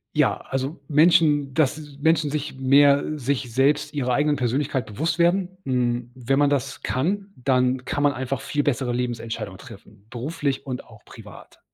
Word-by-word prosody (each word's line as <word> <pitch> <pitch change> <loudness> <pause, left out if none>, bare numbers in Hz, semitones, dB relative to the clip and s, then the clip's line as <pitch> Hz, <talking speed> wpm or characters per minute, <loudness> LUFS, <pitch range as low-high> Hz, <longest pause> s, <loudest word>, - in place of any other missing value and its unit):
Ja, - - +3
also 135 +3 -3
Menschen 150 -3 +4
dass 155 0 +1 0.2
Menschen 160 -2 +2
sich 150 -2 -3
mehr 140 +1 +5 0.2
sich 130 -2 -2
selbst 135 +5 +2
ihrer 125 -3 -1
eigenen 145 +2 +2
Persönlichkeit 130 -1 -1
bewusst 160 - -2
werden. 185 +2 +1
Hm, 120 -2 -1
wenn 130 +2 0
man 145 -1 +4
das 140 -4 -2
kann, 195 +9 -2
dann 125 0 +1
kann 145 - -2
man 145 -1 +3
einfach 130 +1 -3
viel 145 +1 -1
bessere 130 -3 0
Lebensentscheidungen 120 -2 -4
treffen, 100 +2 -15
beruflich 140 +2 -3
und 130 -2 -5
auch 110 -3 -18
privat. 105 -3 -14
135 Hz, 160 wpm, -23 LUFS, 125-150 Hz, 0.2 s, mehr